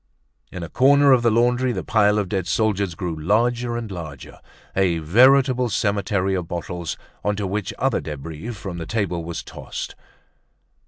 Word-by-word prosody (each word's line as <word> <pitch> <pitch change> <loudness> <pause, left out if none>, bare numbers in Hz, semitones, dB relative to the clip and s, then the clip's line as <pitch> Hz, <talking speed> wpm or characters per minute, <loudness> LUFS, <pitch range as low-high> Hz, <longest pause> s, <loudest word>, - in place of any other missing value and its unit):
In 90 - -6
a - - -5
corner 140 - +5
of 130 -2 +5
the 120 - +3
laundry 125 +3 +2
the 95 -6 -3
pile 105 -1 +3
of 105 -2 0
dead 95 -2 -2
soldiers 100 -4 0
grew 85 -2 -3
larger 120 +8 +1
and 115 -3 -5
larger, 80 -7 -8 0.4
a 95 -3 +2
veritable 125 - +4
cemetery 100 -2 0
of 90 -3 -2
bottles 85 0 -4 0.3
onto 105 0 -1
which 100 +2 -2
other 135 -3 +1
debris 75 - -7
from 95 -6 -6
the 80 - -6
table 95 -6 -1
was 85 +1 -5
tossed. - - -7
100 Hz, 160 wpm, -22 LUFS, 85-120 Hz, 0.4 s, corner